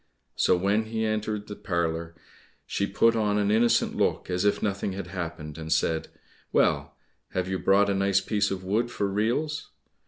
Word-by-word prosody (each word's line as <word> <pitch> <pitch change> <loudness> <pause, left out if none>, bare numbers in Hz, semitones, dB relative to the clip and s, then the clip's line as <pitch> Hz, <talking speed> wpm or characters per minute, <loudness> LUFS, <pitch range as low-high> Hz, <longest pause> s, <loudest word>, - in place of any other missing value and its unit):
So - - +3
when 100 +4 +1
he 110 0 -2
entered 110 -1 -2
the 105 - -6
parlour, 85 -2 -2 0.5
she 100 - -1
put 115 +2 +3
on 105 -2 +1
an 105 0 +2
innocent 115 +2 +3
look - - 0
as 90 +2 0
if 105 - +2
nothing 100 -1 -1
had 95 -1 -5
happened, 85 -4 -6
and 80 0 -6
said, 80 0 +1 0.4
"Well, 70 0 +2 0.4
have 90 -1 -1
you 95 0 -2
brought 100 +1 +4
a - - +2
nice 100 0 +2
piece 105 +1 0
of 95 -1 -4
wood 110 +6 0
for 100 - -2
reels?" 120 +10 -1
100 Hz, 180 wpm, -27 LUFS, 90-105 Hz, 0.5 s, brought